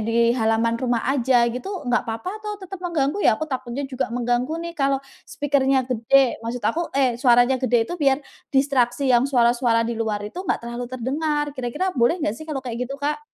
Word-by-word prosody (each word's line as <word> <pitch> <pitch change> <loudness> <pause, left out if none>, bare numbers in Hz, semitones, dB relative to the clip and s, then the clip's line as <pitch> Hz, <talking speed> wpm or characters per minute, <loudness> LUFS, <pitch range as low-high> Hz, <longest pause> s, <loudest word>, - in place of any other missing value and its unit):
di 230 +1 -2 0.2
halaman 225 0 +1
rumah 240 -2 0
aja 250 -2 +3
gitu 250 +10 -6 0.2
nggak 245 - +1
papa 225 +11 -3
atau 420 -1 -5
tetep 385 0 -8
mengganggu 310 -1 0
ya? - - +5
Aku - - -2
takutnya 260 +1 -3
juga 265 0 -2
mengganggu 245 +4 0
nih 340 - -5
kalau 275 0 +2 0.3
speaker-nya 270 -2 +1
gede 250 +3 +3
maksud 235 +1 -4
aku 335 - +1 0.2
eh, 260 -3 +3
suaranya 245 0 +5
gede 240 -2 +3
itu - - -3
biar, 275 -2 +3 0.4
distraksi 270 -1 +2
yang 240 +1 +4
suara-suara 240 -2 +3
di 235 - -2
luar 215 -2 -1
itu 215 - -9
enggak - - 0
terlalu 240 +1 -4
terdengar 295 +4 -1
,kira-kira 295 +10 -2
boleh 240 +8 +3
nggak 205 - +1
sih 315 - -8
kalau 280 -3 -3
kayak 245 0 -3
gitu 275 - -5
Kak? 290 +1 -1
255 Hz, 195 wpm, -23 LUFS, 235-280 Hz, 0.4 s, ya